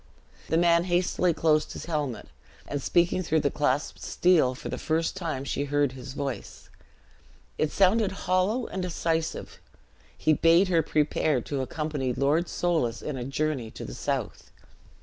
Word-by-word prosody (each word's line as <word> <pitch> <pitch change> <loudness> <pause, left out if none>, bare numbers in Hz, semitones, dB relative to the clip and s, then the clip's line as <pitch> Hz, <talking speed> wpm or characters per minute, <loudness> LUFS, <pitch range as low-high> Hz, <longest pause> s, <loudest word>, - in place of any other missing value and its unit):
The 160 - +2
man 170 0 +4
hastily 180 0 +1
closed 155 -1 +1
his - - -7
helmet, 150 -7 -3 0.4
and, 145 -1 -3
speaking 175 +5 +2
through 160 -3 +1
the 140 - +1
clasped 145 -1 -1
steel, 165 -8 +3
for - - -8
the - - -4
first 160 +2 0
time 160 -8 -3
she 140 +1 -2
heard 145 -1 +1
his 130 0 -9
voice; 135 -7 -6 0.9
it 155 - +1
sounded, 200 +1 +3
hollow 185 +7 +1
and 190 - -4
decisive; 165 -2 -2 0.6
he 155 - +3
bade 170 +5 +4
her 170 -3 +4
prepare 150 -2 +1
to 140 +3 -3
accompany 145 -2 -2
Lord 145 +7 +1
Soulis 160 -10 0
in 150 - -3
a 125 - -4
journey 135 -2 -2
to - - -8
the - - -7
south. - - -3
155 Hz, 155 wpm, -27 LUFS, 140-175 Hz, 0.9 s, man